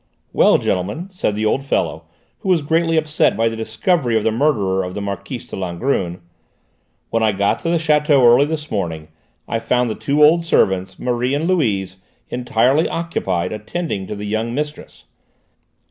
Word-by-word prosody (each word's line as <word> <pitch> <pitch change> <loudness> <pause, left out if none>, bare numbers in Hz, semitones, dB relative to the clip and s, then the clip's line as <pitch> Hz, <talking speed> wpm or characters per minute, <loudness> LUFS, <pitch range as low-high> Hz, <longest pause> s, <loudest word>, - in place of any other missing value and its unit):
"Well, - - +5
gentlemen," 105 - -2
said 180 - -1
the 110 +1 -1
old 135 +5 +1
fellow, 135 - -1 0.3
who - - -4
was 170 -5 +3
greatly 165 +2 +1
upset 155 -1 +1
by 115 +1 +2
the 115 - -5
discovery 115 - 0
of 110 - -1
the 110 - +2
murderer 110 -7 +1
of 90 0 -6
the - - -3
Marquise 100 -1 -5
de - - -8
Langrune, 90 -1 -2 0.9
"when 115 - +1
I 110 -1 +3
got 100 0 0
to 165 - -3
the 170 - +2
château 150 -3 +3
early 120 +4 +6
this 150 0 -5
morning 80 -6 -3 0.4
I 115 - -1
found 125 0 0
the - - -1
two 145 +6 +1
old 165 +3 +5
servants, 95 - +1
Marie 125 +2 -1
and 155 +3 -1
Louise, 100 - 0 0.3
entirely 125 +5 +1
occupied 95 - -2
attending 105 - -4
to - - -5
the 105 0 -6
young 110 +3 -2
mistress. 150 +1 -6
120 Hz, 175 wpm, -19 LUFS, 100-150 Hz, 0.9 s, early